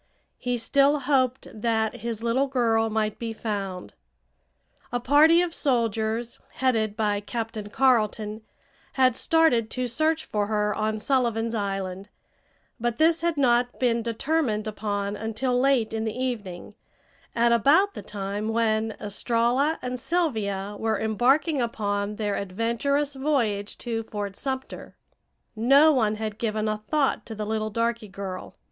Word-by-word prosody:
He 245 -1 -1
still 280 +5 +3
hoped 260 -2 +1
that 220 +1 -1
his 230 -1 -5
little 250 +4 +1
girl 225 -4 +1
might 215 -1 -1
be 230 -1 -4
found. 195 - -4 1.0
A 245 - 0
party 305 +7 +5
of 345 -2 -3
soldiers, 230 -4 -1
headed 225 -5 0
by 210 -2 +1
Captain 220 -1 -5
Carleton, 215 -3 +1 0.5
had 255 -3 +3
started 285 -10 +3
to 255 +2 -2
search 315 +6 0
for 205 -1 -1
her 210 -1 0
on 215 0 -1
Sullivan's 230 -1 0
Island, 195 -2 -3 0.7
but 240 0 -1
this 325 +1 +3
had 335 -2 0
not 245 -2 +2
been 235 -2 +2
determined 230 -1 -1
upon 205 -1 -3
until 225 +4 -1
late 255 -4 +2
in 220 0 -1
the 220 +1 -3
evening, 210 -8 -4 0.6
at 235 0 +3
about 310 - +4
the - - -7
time 205 +1 -4
when 220 -1 0
Estralla 240 +8 +1
and 250 0 -3
Sylvia 220 - -1
were 220 -2 0
embarking 260 - +2
upon 205 -3 -2
their 205 -1 -2
adventurous 235 +9 -1
voyage 240 -8 -1
to 230 -2 -3
Fort 205 -3 -5
Sumter. 265 +2 -5 0.6
No 275 +8 +6
one 220 -5 +2
had 215 -1 -5
given 215 -1 -1
a 215 0 -1
thought 300 -3 +1
to 225 - -6
the 210 0 -4
little 215 0 -2
darky 230 0 -1
girl. 190 -1 -7
230 Hz, 140 wpm, -25 LUFS, 215-260 Hz, 1.0 s, No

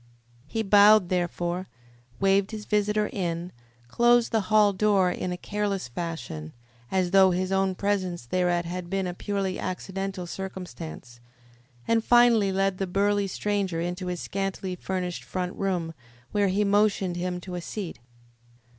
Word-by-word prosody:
He 225 +7 -2
bowed, 205 -1 +6
therefore, 175 0 -1 0.5
waved 195 0 +3
his 215 -2 -7
visitor 210 0 +1
in, 175 -2 -3 0.4
closed 240 - +3
the 225 - +2
hall 210 -1 +5
door 195 -2 +3
in 180 - -3
a 180 - -3
careless 200 -4 -2
fashion, 120 - -6 0.4
as 185 -2 +1
though 195 -1 +7
his 185 +1 -1
own 190 -1 +1
presence 185 -6 -1
thereat 175 +4 +1
had 175 0 -5
been 195 0 -1
a 180 - -3
purely 195 0 -2
accidental 190 0 -4
circumstance, 170 -9 -7 0.7
and 225 -1 +2
finally 235 -5 +5
led 195 0 0
the 195 - -1
burly 200 +2 +1
stranger 195 -3 -1
into 175 +2 -3
his 180 -1 -3
scantily 195 -1 -3
furnished 180 -1 -4
front 180 -1 -3
room, 180 -4 -2 0.4
where 205 -1 +2
he 195 +2 +1
motioned 200 -3 +2
him 180 0 -2
to 180 +1 -8
a 175 - -3
seat. 185 +1 -6
190 Hz, 145 wpm, -26 LUFS, 180-205 Hz, 0.7 s, though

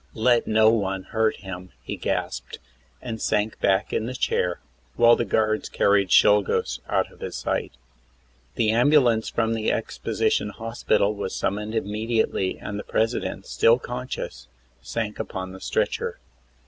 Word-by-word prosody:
"Let 120 +1 +3
no 110 0 +5
one 95 -4 -1
hurt 110 +1 0
him," 90 -2 -8
he - - -4
gasped, - - -3 0.5
and 115 -3 -5
sank 105 +1 0
back 95 0 +1
in 110 - 0
the 130 - -5
chair, 90 -7 0 0.4
while 120 0 +6
the 120 - -1
guards 110 +1 0
carried 100 -2 +2
Czolgosz 105 +1 +4
out - - 0
of - - -19
his - - -6
sight. - - -2 0.8
The 110 -2 +2
ambulance 120 -2 +4
from 115 -1 0
the 110 -1 0
exposition 105 - -1
hospital 115 -1 0
was 100 -2 -4
summoned 105 +3 -2
immediately 110 -2 -1
and 105 0 -5
the - - -5
President, 115 +2 -1
still 115 +1 +4
conscious, 125 - -6 0.3
sank 105 - -4
upon 95 0 -5
the 95 0 -11
stretcher. - - -1
110 Hz, 145 wpm, -24 LUFS, 100-115 Hz, 0.8 s, while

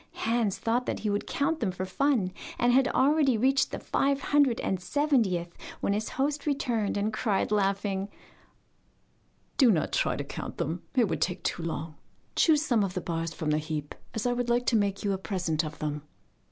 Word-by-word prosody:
Hans 225 -3 0
thought 240 +2 0
he 210 - 0
would 205 - -2
count 310 +3 0
them 220 - 0
for 185 +1 -4
fun, 220 -1 +1 0.3
and 240 0 +3
had 265 +1 +5
already 275 -2 +3
reached 265 +4 +3
the - - -4
five 280 0 0
hundred 280 -4 +3
and 185 -1 -1
seventieth 195 - +1 0.2
when 200 - 0
his 215 +1 -2
host 285 +2 -1
returned 240 -8 0
and 210 +2 0
cried, 210 -3 0
laughing: 195 -1 0 1.5
'Do 260 -4 +6
not 175 -8 +2
try - - +1
to - - -3
count - - -7
them, 165 +3 -2
it 240 -4 +4
would - - -3
take 180 - -1
too - - -1
long; 160 -1 -4 0.4
choose 310 -2 +4
some 230 -7 +2
of 185 -2 -3
the - - 0
bars 165 -1 -3
from 155 -1 -2
the 150 - +2
heap, 150 -1 -4 0.2
as 220 - -2
I 245 0 +1
should 245 0 -1
like 240 +1 +2
to 235 - +2
make 200 -2 +1
you 200 -1 +1
a 190 - -3
present 175 -5 -1
of 155 0 -6
them. 150 -1 -3
210 Hz, 195 wpm, -28 LUFS, 180-255 Hz, 1.5 s, Do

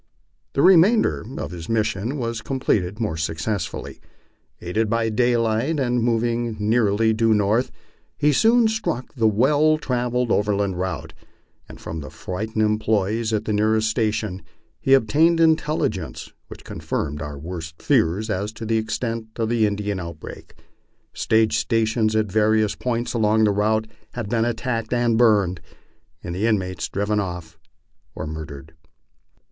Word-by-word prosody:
The 140 - +2
remainder 185 - +5
of 75 - -4
his 85 -2 -8
mission 110 +3 -1
was 115 -3 -3
completed 105 -7 -1
more 105 -8 -2
successfully. 80 +4 -3 0.6
Aided 105 +5 -1
by 115 0 +1
daylight, 120 +5 +1
and 125 -2 +1
moving 115 -1 0
nearly 110 0 +2
due 110 0 +3
north, 105 +5 +1 0.5
he 150 0 +3
soon 230 - +4
struck 180 - -3
the 115 -5 +2
well 145 +8 +3
travelled 125 -3 -1
over 105 0 +2
land 100 -3 -1
route, 80 -4 -4 0.6
and - - -11
from 80 - -6
the 75 -3 -7
frightened 110 - -3
employes 110 +1 0
at 110 0 -1
the 110 - -1
nearest 110 +1 +2
station 110 -4 -1 0.4
he 135 - +5
ob 135 - +2
tained 165 +9 +3
intelligence 150 - 0
which - - -11
confirmed 75 0 -4
our 75 -2 -6
worst 80 +1 -7
fears 95 +7 +1
as 100 +2 -2
to 110 +1 -7
the 115 +1 +1
extent 115 +1 -3
of 115 -1 -1
the 115 -2 +2
In 100 - -1
dian 105 -1 -3
outbreak. 85 -3 -9 0.6
Stage 110 -1 +2
stations 110 -1 +1
at 110 -3 +1
various 110 0 +2
points 120 -1 -2
along 110 -1 +2
the 105 - +4
route 110 +2 +1 0.3
had 115 -4 -5
been 115 0 +1
at 120 -1 -1
tacked 115 -3 -2
and 120 -1 +2
burned, 100 -7 +3 0.6
and 85 - -5
the 100 +5 0
inmates 95 -6 -1
driven 105 +1 -1
off 90 -4 -5 0.6
or - - -5
murdered. 75 -1 -8
110 Hz, 150 wpm, -22 LUFS, 100-120 Hz, 0.6 s, remainder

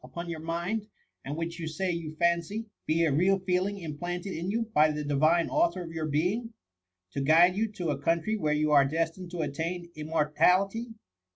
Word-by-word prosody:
107 - - -13
upon 170 0 -5
your 160 - -5
mind, 175 +6 -2 0.4
and 145 +3 -5
which 165 +1 -4
you 160 - -4
Bay^j/ou 165 -1 -3
fancy, 170 +6 0 0.2
be 165 +2 +2
a 155 - +2
real 185 +7 +3
feeling 185 +2 -1
implanted 175 +3 -5
in 170 +3 -3
you 230 +3 0
by 155 +1 +5
the 150 0 -3
Divine 155 +4 +3
Author 310 - +1
of 165 - -8
your 160 -1 -3
being, 195 +10 -1 0.6
to 140 - -3
guide 165 +6 +5
you 220 +1 0
to 175 -5 -3
a 140 - -3
eountry 170 +8 +1
where 155 -7 0
you 150 0 +1
are 145 -2 +7
destined 165 +5 -2
to 175 -1 -4
attain 170 +4 -4
im 150 0 -6
mortality? 180 +8 +2
170 Hz, 195 wpm, -28 LUFS, 155-185 Hz, 0.6 s, are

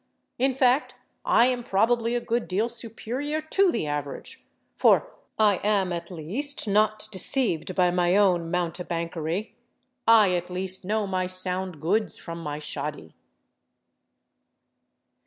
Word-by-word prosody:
In 265 +1 +2
fact, 260 +2 +2 0.3
I 235 - +5
am 250 -1 +1
probably 230 +2 +1
a - - +2
good 235 0 -2
deal 210 +6 0
superior 240 +6 -4
to 360 +4 +2
the 160 - -2
average, 145 -1 -5 0.3
for - - +3 0.2
I 210 -3 +4
am 200 -3 +1
at 170 0 -5
least 215 - -3
not 215 +1 +2
deceived 190 - -1
by 180 -2 +3
my 175 +1 +2
own 180 -5 +3
mountebankery—I 175 +4 0
at 175 0 -2
least 185 +1 -3
know 210 +3 0
my 185 -1 -1
sound 185 -2 -1
goods 205 +8 0
from 170 0 -8
my 150 -2 -4
shoddy." 150 - -5
190 Hz, 125 wpm, -26 LUFS, 175-230 Hz, 0.3 s, I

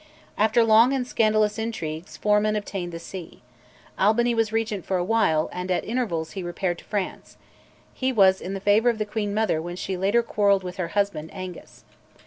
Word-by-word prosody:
After 220 +2 +3
long 225 +4 +5
and 260 -2 -1
scandalous 215 -2 +1
intrigues, 170 -7 -5
Forman 210 0 +2
obtained 195 -4 -4
the 165 - -6
see. 170 -4 -9 0.6
Albany 235 +4 +3
was 225 -2 +1
Regent 220 -4 -1
for 190 - -1
a 175 - 0
while, 180 -7 +2
and 180 +1 -5
at 180 - 0
intervals 205 -10 -2
he 195 - -5
repaired 175 0 -3
to - - -16
France; 205 -3 -4 0.6
he 260 0 -1
was 190 -5 +4
in 190 +2 -4
the - - -4
favour 205 +4 +3
of 235 - 0
the 215 - -1
queen 210 -1 -3
mother 210 -6 0
when 175 +2 -6
later 195 +5 +2
she - - -22
quarrelled 200 -2 +2
with 180 -1 -7
her 180 -3 -2
husband, 200 -6 0
Angus. 185 -2 -9
205 Hz, 190 wpm, -24 LUFS, 180-220 Hz, 0.6 s, long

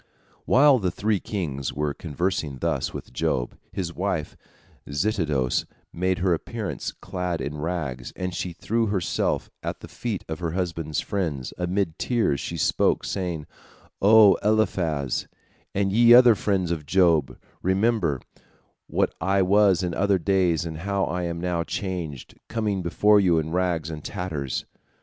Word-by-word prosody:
While 140 0 +6
the 95 -3 0
three 105 +2 0
kings 75 - -3
were 75 0 -1
conversing 80 -3 -2
thus - - -1
with - - -8
Job, - - -1 0.2
his 85 -3 -4
wife 90 -5 -2 0.5
Zitidos 75 - 0 0.3
made 95 +1 0
her 90 -1 +2
appearance 105 +4 -4
clad 90 -2 -4
in 75 +1 -4
rags, 75 -7 -3
and 90 -1 -3
she 90 +1 -3
threw 115 +6 -1
herself 95 -4 -1
at - - -5
the - - -9
feet 115 -6 -4
of 80 +1 -5
her 85 -2 -3
husband's 85 -4 -2
friends, 80 -10 -3
and 90 - -2
amid 95 -4 -1
tears 115 - +1
she 85 - -4
spoke, 75 - +2
saying: 85 -5 -3 0.6
"O 105 0 +7
Eliphaz, 90 - +1 0.5
and 100 0 +1
ye 120 +3 +7
other 125 -1 +8
friends 95 -4 0
of 75 -4 -3
Job, 85 -7 +3 0.2
remember 95 - +1 0.7
what - - 0
I 95 0 +2
was 95 -1 +4
in 90 -1 -1
other 100 +1 +2
days, 90 -3 +1
and 80 -1 -5
how 100 +2 -1
I 90 +1 -2
am 85 0 -3
now 85 -1 -1
changed, 85 -8 -5
coming 105 -4 -1
before 105 +4 +4
you 90 -4 +3
in 80 0 -1
rags 85 -3 0
and 75 -1 -7
tatters." 80 - -3
90 Hz, 150 wpm, -25 LUFS, 80-100 Hz, 0.7 s, other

